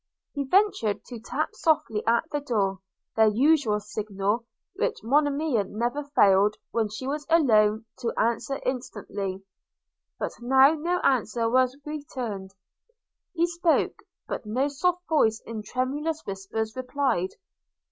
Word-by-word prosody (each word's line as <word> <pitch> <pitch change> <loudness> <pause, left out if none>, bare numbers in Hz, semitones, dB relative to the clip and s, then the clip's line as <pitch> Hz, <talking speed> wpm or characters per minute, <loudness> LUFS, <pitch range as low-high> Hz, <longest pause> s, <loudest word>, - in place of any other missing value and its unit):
He 280 -1 -2
ventured 365 - +2
to 240 -3 -8
tap 225 - -3
softly 235 -9 +1
at 235 +4 +4
the 295 - 0
door, 205 -9 -1 0.4
their 220 0 +5
usual 245 -1 +3
signal, 210 +2 -2 0.3
which 395 - -2
Monimia 285 -1 +2
never 240 +8 -2
failed, 200 +1 +5 0.2
when 225 -2 0
she 215 +5 -6
was 290 +2 -3
alone, 220 -9 +4
to 235 -3 -1
answer 235 +4 0
instantly; 205 -6 -4 0.7
but - - -3
now 265 +4 +6
no 335 +3 -1
answer 235 -2 +1
was 255 +2 +2
returned. 255 -10 -5 0.9
He 335 0 +3
spoke 345 -1 +1 0.2
– - - -61
but - - -4
no 250 +7 0
soft 360 +5 -1
voice 225 -9 +3
in 225 -2 -5
tremulous 285 +8 -2
whispers, 200 +3 -4
replied. 255 -7 -1
245 Hz, 130 wpm, -26 LUFS, 215-290 Hz, 0.9 s, now